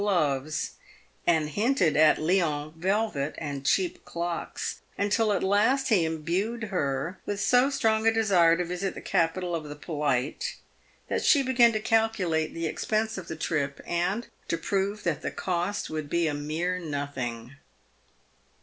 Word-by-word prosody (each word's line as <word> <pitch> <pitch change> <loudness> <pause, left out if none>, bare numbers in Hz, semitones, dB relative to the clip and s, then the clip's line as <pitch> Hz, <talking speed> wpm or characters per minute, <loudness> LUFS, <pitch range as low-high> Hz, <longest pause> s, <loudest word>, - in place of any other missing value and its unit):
gloves; 155 -6 0 0.6
and 160 -3 +3
hinted 205 - +2
at 155 0 +6
Lyons 155 -3 0
velvet 185 -4 -1
and 145 -3 -5
cheap 180 +5 +1
clocks, 170 0 -4 0.2
until 210 +2 +2
at 200 - 0
last 225 +8 +3
he 200 -7 +4
imbued 175 +9 -2
her 165 -3 -2
with 205 -1 -2
so 250 +5 +4
strong 225 -5 +1
a - - +7
desire 185 -7 +4
to 180 - -1
visit 180 +3 -3
the - - -6
capital 175 0 0
of 160 -2 -2
the 145 0 -7
polite, 145 -4 -2 0.5
that - - -1
she 285 -3 +5
began 245 -2 +5
to 215 - -1
calculate 215 -8 +1
the 165 0 -4
expense 220 +7 -1
of 185 -3 -7
the 160 - -5
trip, 145 -3 -2
and 180 +7 -1 0.2
to 165 - 0
prove 200 +3 -1
that 160 -5 -1
the - - -2
cost 180 +2 -2
would 155 -2 -4
be 170 +1 +1
a 155 - 0
mere 160 +5 -2
nothing. 140 -6 -4
175 Hz, 155 wpm, -27 LUFS, 155-210 Hz, 0.6 s, a